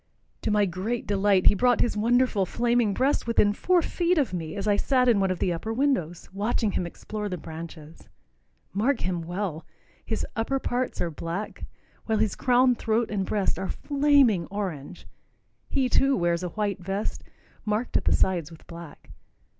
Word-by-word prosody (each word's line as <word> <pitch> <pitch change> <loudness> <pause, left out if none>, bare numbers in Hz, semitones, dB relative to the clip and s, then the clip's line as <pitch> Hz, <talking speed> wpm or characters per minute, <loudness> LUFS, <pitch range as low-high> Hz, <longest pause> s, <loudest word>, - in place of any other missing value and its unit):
To - - -1
my 210 -1 +3
great 195 +6 -3
delight, 200 -2 +2
he - - +7
brought 245 +4 +3
his 240 - +1
wonderful 235 -1 +2
flaming 235 -1 +1
breast 260 +4 0
within 210 -3 +3
four 355 - +2
feet 350 +2 0
of 275 -10 +1
me 165 0 -4
as 200 +1 -3
I 205 - +4
sat 250 +4 +2
in 230 -4 +4
one 195 -1 +1
of 185 - -1
the 180 - 0
upper 170 +7 -4
windows, 225 - -1
watching 210 +1 0
him 175 - -2
explore 210 +4 -6
the 180 - -3
branches. 160 -1 -10 0.6
Mark 235 +6 +1
him 180 -1 -1
well. 175 -1 -4 0.4
His 220 - -3
upper 230 +4 0
parts 255 -1 -2
are 170 - -1
black, 170 +7 -5 0.4
while 220 -1 +1
his 215 -2 +1
crown, 250 0 +3
throat 225 -1 -1
and 195 -3 -1
breast 205 -3 0
are 190 - -3
flaming 280 - +3
orange. 180 -5 -6 0.6
He, 265 -2 +1
too, 270 +2 +3
wears 170 -1 +1
a 180 - -3
white 205 +1 -2
vest, 195 +3 -3 0.4
marked 215 +3 -2
at - - +2
the - - +3
sides 175 -5 +1
with 165 - -14
black. 170 -2 -11
205 Hz, 180 wpm, -26 LUFS, 180-240 Hz, 0.6 s, he